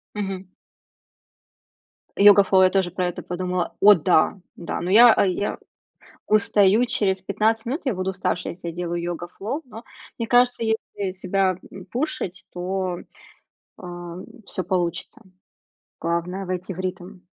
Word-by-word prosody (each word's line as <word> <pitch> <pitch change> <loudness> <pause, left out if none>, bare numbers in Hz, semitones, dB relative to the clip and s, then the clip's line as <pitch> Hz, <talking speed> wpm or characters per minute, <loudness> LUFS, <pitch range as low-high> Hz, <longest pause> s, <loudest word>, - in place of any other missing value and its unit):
Мгм. 195 -2 -4 1.7
"Йога-флоу", 200 -2 +6
я 185 - +6
тоже 185 -2 0
про 180 0 -1
это 175 - -5
подумала, 180 0 -3
о 205 +1 +9
да, 175 +2 +2 0.2
да, 170 - -5
но 175 - -3
я 230 +3 +7
я 195 +2 -1 0.7
устаю 215 +1 +4
через 190 -5 0
15 220 +4 0
минут, 275 +9 -3
я 260 - +1
буду 185 +1 -2
уставшей, 185 -1 -2
если 170 -1 -7
я - - -7
делаю 175 0 -3
"йога-флоу", 175 - -5
но 225 -1 -11 0.3
мне 230 - -3
кажется, 245 -1 +3
если 215 -3 -2
себя, 185 -1 0
м, 190 -1 -10
пушить, 235 - -4
то, 180 0 -3 0.8
а, 175 -1 -8 0.3
всё 185 - -4
получится, 175 0 -2 0.8
главное 170 +3 -2
войти 185 0 -4
в 185 - -7
ритм. 185 +1 -6
190 Hz, 135 wpm, -23 LUFS, 180-210 Hz, 1.7 s, о